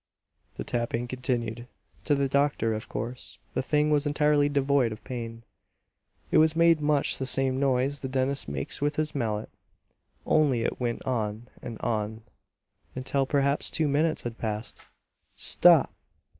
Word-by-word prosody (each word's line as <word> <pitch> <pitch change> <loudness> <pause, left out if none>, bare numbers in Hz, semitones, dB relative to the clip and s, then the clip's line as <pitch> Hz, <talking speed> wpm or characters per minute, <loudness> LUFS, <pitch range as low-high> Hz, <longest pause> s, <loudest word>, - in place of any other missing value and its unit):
The - - -3
tapping 120 0 -2
continued. 120 -2 -2 0.4
To 145 - +3
the 140 0 +1
doctor, 140 -5 +1
of 110 - -5
course, 120 +3 -5 0.2
the - - 0
thing 150 +3 +1
was 145 0 +2
entirely 145 0 +3
devoid 140 -4 +2
of 110 - -8
pain. 115 -2 -6 0.9
It 155 0 +4
made 165 -1 +4
much 150 -1 +1
the 130 - -2
same 135 -1 +1
noise 135 +1 +1
the 130 - -3
dentist 130 - 0
makes 70 - -3
with 145 0 0
his 155 0 -1
mallet, 110 -5 -2 0.7
only 135 -7 +3
it - - -2
went 120 -2 -2
on 115 -2 -2
and 115 -2 -7
on, 110 -1 -2 0.7
until 135 +1 -1
perhaps 140 0 +1
two 160 -2 0
minutes 155 +3 +1
had 120 -1 -6
passed. 110 0 -3 0.5
"Stop!" - - +4
130 Hz, 145 wpm, -27 LUFS, 115-145 Hz, 0.9 s, It